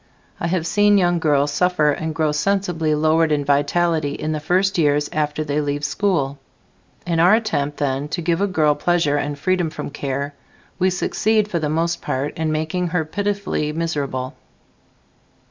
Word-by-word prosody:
I 170 - -1
have 170 -1 -1
seen 205 +4 +4
young 175 -2 +2
girls 145 -3 +2
suffer 155 -1 +2
and 160 +2 -3
grow 155 -2 +1
sensibly 165 -1 0
lowered 155 +1 +2
in 145 -1 +1
vitality 145 +1 +1
in 155 - -3
the 155 - -2
first 180 +4 +1
years 145 -1 +2
after 150 0 -1
they 150 0 -1
leave 145 0 -2
school. 145 -5 0 0.7
In 170 -2 0
our 180 +5 +6
attempt 150 -11 -1
then 140 0 -1
to 155 +4 -3
give 170 +2 0
a 200 - +2
girl 155 -5 +2
pleasure 165 -2 +1
and 145 0 -2
freedom 180 +1 0
from 150 - -6
care 140 0 -3 0.5
we 185 0 +3
succeed, 210 +3 +1
for 170 - 0
the 150 -2 -1
most 165 +2 -1
part, 135 +3 -3
in 160 -1 -1
making 160 +4 -1
her 165 -2 -1
pitifully 200 -3 -2
miserable. 140 -6 -3
155 Hz, 170 wpm, -21 LUFS, 145-180 Hz, 0.7 s, our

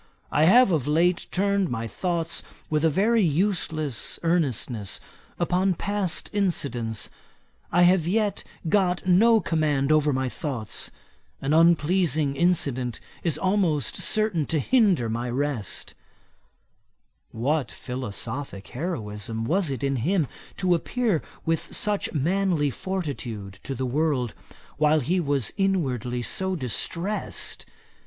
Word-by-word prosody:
I 150 +2 +4
have 240 +5 +6
of 150 -5 0
late 170 +4 +2
turned 200 -1 +1
my 115 -2 -3
thoughts 170 - -1 0.3
with 150 0 +1
a 160 - +5
very 215 +8 +3
useless 160 - 0
earnestness 130 - 0 0.4
upon 180 +2 +1
past 200 -1 -1
incidents. 125 - -1 0.6
I 175 - +4
have 175 -2 +4
yet 210 +2 0 0.2
got 180 -1 +1
no 220 +5 +5
command 150 -5 +1
over 150 -1 +4
my 130 -1 0
thoughts; 125 -5 -3 0.5
an 140 +2 -1
unpleasing 160 -2 +3
incident 135 -8 +1 0.2
is 165 -4 0
almost 185 - +1
certain 215 -9 +1
to 160 - 0
hinder 195 - +3
my 120 +2 -2
rest.' 130 -5 -2 1.4
What 135 +4 0
philosophick 125 -2 -5
heroism 115 - -4
was 175 +4 +1
it 135 -2 -4
in 135 -1 +1
him 160 - +1 0.3
to 185 -2 +2
appear 210 0 0 0.2
with 165 0 -1
such 210 -1 +1
manly 165 -1 +1
fortitude 120 - -5
to 135 - -5
the 130 +1 -2
world, 130 -3 0 0.4
while 155 +1 +3
he 175 +8 +1
was 140 -6 +1
inwardly 130 - 0
so 190 +8 +1
distressed! 170 - -3
155 Hz, 120 wpm, -25 LUFS, 130-185 Hz, 1.4 s, have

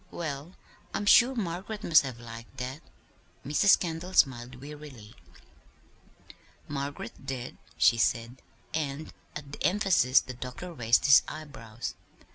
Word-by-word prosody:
Well, 155 +1 -5 0.4
I'm 205 - -2
sure 245 +5 +6
Margaret 200 +1 -4
must 160 -2 +6
have 130 -4 -6
liked 115 +2 -11
that." 130 +4 -5 0.6
Mrs. 150 +8 +5
Kendall 175 +1 -4
smiled 125 -1 +3
wearily. 140 -6 -11 1.5
"Margaret 140 -4 -5
did," 130 -2 -5 0.2
she 115 - +4
said; 115 +2 0 0.3
and 150 -1 -3 0.2
at 145 -2 -7
the - - -7
emphasis 180 - +4
the 125 - -7
doctor 125 +8 -7
raised 120 -5 +2
his 140 -2 +8
eyebrows. 120 -7 -7
140 Hz, 120 wpm, -29 LUFS, 125-165 Hz, 1.5 s, his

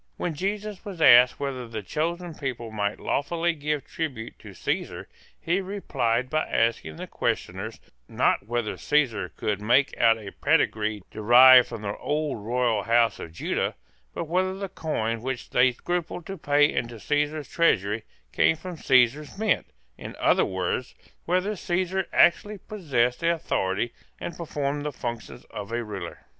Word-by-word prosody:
When 175 - -2
Jesus 205 +4 -3
was 200 -5 -8
asked 125 -5 +7
whether 135 -3 -4
the 110 -2 -6
chosen 170 - -3
people 125 -6 -5
might 105 -1 -2
lawfully 170 +4 0
give 150 -1 -3
tribute 130 -9 -5
to - - -12
Caesar, - - -3 0.3
he 175 +4 0
replied 130 - -1
by 155 +4 -1
asking 115 -9 0
the - - -6
questioners, 95 +5 -3 0.3
not 100 - +1
whether 120 -2 -2
Caesar 120 -11 +1
could 105 +5 -3
make 125 +6 +3
out 115 -1 +5
a 105 -3 -9
pedigree 110 - +1
derived 125 +3 +7
from 115 -3 -7
the 100 0 -3
old 150 -7 -2
royal 120 -1 +1
house 115 +1 +2
of 80 - -7
Judah, 80 - -2 0.4
but - - -4
whether 185 +3 0
the 195 0 -5
coin 115 -10 -2
which 130 0 -5
they 125 +1 +4
scrupled 175 +5 -4
to 195 - -5
pay 145 -3 +3
into 120 -2 -3
Caesar's 150 +3 -1
treasury 110 - +1 0.3
came - - +4
from 175 +2 -8
Caesar's 135 +4 +2
mint, 215 -2 +1 0.3
in - - -8
other - - +3
words, 95 +6 -3 0.3
whether 185 +4 0
Caesar 185 +1 -1
actually 205 +4 +3
possessed 135 - -1
the 170 0 +2
authority 115 - -1 0.3
and 170 - -5
performed 145 -3 -3
the 150 - -2
functions 120 -3 -6
of 105 -1 -7
a 120 0 -1
ruler. 100 -6 -7
130 Hz, 155 wpm, -26 LUFS, 115-165 Hz, 0.4 s, asked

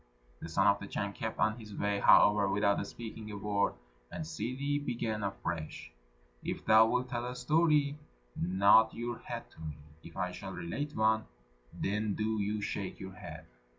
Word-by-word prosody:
The - - -7
Son 95 +4 +2
of 100 0 +5
the 100 - -7
Chan 100 -1 -3
kept 110 +2 -4
on 110 +2 +1
his 105 -2 -10
way, 100 0 0
however, 105 0 +6
without 100 0 +2
speaking 110 -2 -8
a 105 - -5
word, 100 0 0 0.4
and 160 - -4
Ssidi 140 0 -2
began 115 -4 -2
afresh, 85 -5 -4 0.5
"If - - -4
thou 110 +1 +7
wilt 125 +2 0
tell 120 -1 -2
a 125 - -5
story, 150 +2 +2 0.4
nod 100 +5 +5
your 120 0 -4
head 120 -1 -7
to - - -16
me; 75 -2 -6 0.2
if 85 +1 -12
I 90 -1 -1
shall 95 +1 -7
relate 135 - -4
one, 110 0 +3 0.5
then 105 +1 -1
do 110 0 0
you 105 +1 -1
shake 100 -1 -4
your 95 0 -7
head." 95 - -9
105 Hz, 175 wpm, -32 LUFS, 100-120 Hz, 0.5 s, thou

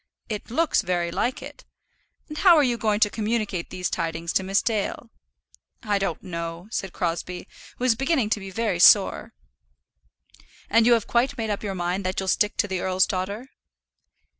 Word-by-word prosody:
"It 210 0 -5
looks 320 +7 +2
very 175 -1 -1
like 245 +8 -2
it. - - -11 0.6
And 305 0 -7
how 360 -3 +7
are 300 - +5
you 245 -3 +1
going 215 -2 0
to 210 - +5
communicate 215 -5 -2
these 180 0 -3
tidings 165 0 -3
to - - +2
Miss 195 +1 +1
Dale?" 225 +1 -2 0.7
"I 205 -2 0
don't 175 -5 -3
know," 170 0 -6
said 195 -4 -3
Crosbie, 175 +1 -3 0.3
who - - -6
was 255 -2 +4
beginning 265 -3 0
to 215 - +1
be 195 -1 -8
very 200 -2 -1
sore. 195 +2 +5 1.4
"And 230 +2 +5
you 240 - +7
have 230 -3 +1
quite 260 +4 +1
made 220 -2 -2
up 205 - -3
your 200 -2 -4
mind 180 +2 -2
that 185 - -2
you'll 190 -1 -2
stick 210 +2 +1
to 205 - +1
the 190 -2 -2
earl's 185 0 +2
daughter?" 200 +7 -4
205 Hz, 185 wpm, -24 LUFS, 185-230 Hz, 1.4 s, how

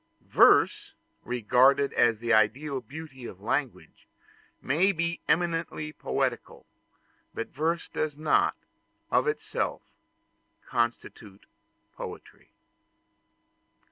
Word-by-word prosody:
Verse, - - +4 0.3
regarded 125 +4 +3
as 115 -2 +3
the 120 0 0
ideal 130 +6 +2
beauty 135 0 -10
of 95 - -9
language, 125 +5 -4 0.5
may 170 +9 +2
be 170 -1 -2
eminently 165 -2 -1
poetical; - - -3 0.7
but 115 - -4
verse 165 +4 -2
does 150 -2 -3
not, 155 +1 +2 0.6
of - - +2
itself, 450 - -2 0.8
constitute 115 -4 -3 0.5
poetry. - - -10
140 Hz, 85 wpm, -27 LUFS, 120-160 Hz, 0.8 s, Verse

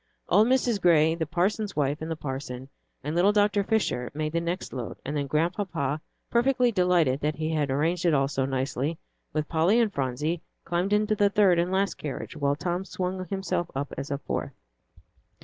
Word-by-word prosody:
Old 215 +2 +5
Mrs. 245 -5 +2
Gray, 160 -2 +5
the 165 -2 -2
parson's 195 +5 0
wife 145 +1 0
and 160 - -4
the 165 - -1
parson, 130 -3 -6 0.3
and 150 +3 -3
little 185 +4 +5
Dr. 205 -1 +3
Fisher 190 - 0
made 155 0 -2
the 170 +1 0
next 170 +2 -3
load, 125 -4 -5
and 145 - -3
then 140 -1 -1
Grandpapa, 160 -2 -1 0.3
perfectly 245 0 +3
delighted 180 - +2
that 150 +1 -1
he 155 +1 -2
had 150 -3 0
arranged 165 +6 0
it 165 - +4
all 135 -1 +3
so 135 -1 -1
nicely, 135 +3 -2 0.3
with 155 -1 -1
Polly 170 +8 +3
and 220 -4 +2
Phronsie, 145 +5 -1 0.2
climbed 175 +3 -1
into 210 +1 +3
the 205 -1 +3
third 195 -4 +4
and 175 +2 0
last 195 +1 0
carriage, 150 +1 -5
while 140 -2 +1
Tom 175 +4 -2
swung 185 -1 -3
himself 180 -2 -2
up 140 +1 -3
as 140 - -5
a 140 - -1
fourth. 140 -1 -4
165 Hz, 190 wpm, -27 LUFS, 145-195 Hz, 0.3 s, Old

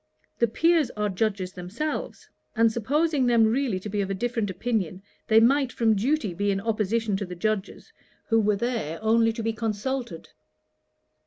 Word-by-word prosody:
The 235 - +4
Peers 325 +3 +2
are 210 0 0
Judges 195 -2 -2
themselves; 210 +13 -5 0.3
and 230 0 +4
supposing 280 +4 +1
them 235 -2 +5
really 230 -3 0
to 210 - -6
be 205 0 -1
of 195 - -3
a 195 - -1
different 230 0 -2
opinion, 190 -2 -2 0.2
they 220 0 +6
might 265 +3 +3
from 225 -2 +2
duty 225 - 0
be 205 +4 -1
in 195 -1 +1
opposition 220 0 0
to 200 - -3
the 180 - -7
Judges, 210 +2 -3 0.3
who 225 -1 +2
were 210 -1 +2
there 215 -8 -2
only 225 +1 +3
to 225 0 -5
be 225 0 0
consulted.' 225 -2 -3
220 Hz, 170 wpm, -26 LUFS, 200-240 Hz, 0.3 s, they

